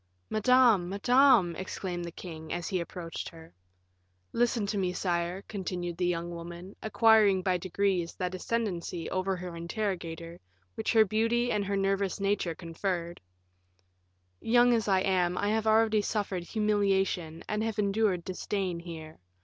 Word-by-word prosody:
"Madame, 220 -4 +4
madame," 230 -3 +4
exclaimed 180 -1 -4
the 170 - -6
king, 160 -2 -9
as 175 -1 -3
he 185 -3 0
approached 170 -1 -6
her. 165 -1 -14 0.8
"Listen 235 -2 +1
to 205 - -2
me, 185 -3 0
sire," 175 +1 -2
continued 180 -4 -4
the 180 +1 0
young 170 0 -2
woman, 175 +3 -8
acquiring 215 -3 +4
by 185 -1 +2
degrees 185 -1 -1
that 180 -1 -3
ascendency 185 -5 -3
over 190 0 0
her 180 -1 -7
interrogator 170 -2 -4 0.3
which 220 - -2
her 220 -1 +6
beauty 230 +4 +1
and 210 -1 +1
her 200 0 -1
nervous 195 0 0
nature 195 -4 0
conferred; 170 0 -4 1.2
"young 245 +1 +4
as 225 -2 +1
I 190 -2 +3
am, 180 -2 +1
I 205 - 0
have 220 0 0
already 220 -1 +4
suffered 200 -4 -2
humiliation, 195 -6 0
and 210 0 -1
have 225 -1 -2
endured 200 -3 +1
disdain 185 -1 -3
here. 160 -2 -9
190 Hz, 145 wpm, -29 LUFS, 175-215 Hz, 1.2 s, her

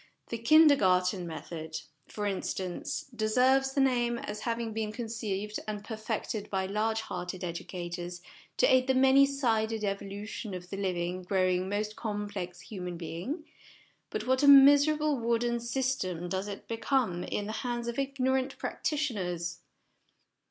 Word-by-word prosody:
The 230 - -3
Kindergarten 220 - +5
SOME 175 - -5
PRELIMINARY - - -6
CONSIDERATIONS 160 -2 -7
9 - - -33
Method, 145 -4 -24
for 210 - -3
instance, 190 -2 -3
deserves 255 +5 +3
the 275 - +3
name, 240 -3 +2
as 210 -2 -5
having 230 0 -2
been 220 -1 -2
conceived 215 -3 -3
and 210 -1 -4
perfected 220 -1 -4
by 190 -1 0
large 220 +3 0
hearted 180 -3 -5
edu 170 -2 -5
cators 175 -1 -5 0.4
to - - +5
aid 255 0 +4
the 265 - +3
many 265 +1 +6
sided 225 -5 0
evolution 200 +1 -4
of 180 0 -9
the 195 - -4
living, 180 -2 -2
growing, 185 0 +1
most 210 +1 -2
complex 205 -5 -4
human 180 -4 -6
being; 180 - -5 0.6
but - - -3
what 260 +1 +2
a 285 - +4
miserable 285 +1 +7
wooden 235 +1 +1
system 235 -8 -2
does 190 +3 -2
it 200 -1 -7
become 230 -6 0
in 205 - -3
the 215 - -4
hands 240 -1 -3
of 235 +2 -2
ignorant 265 -1 0
practitioners 180 - -2
215 Hz, 150 wpm, -30 LUFS, 185-255 Hz, 0.6 s, miserable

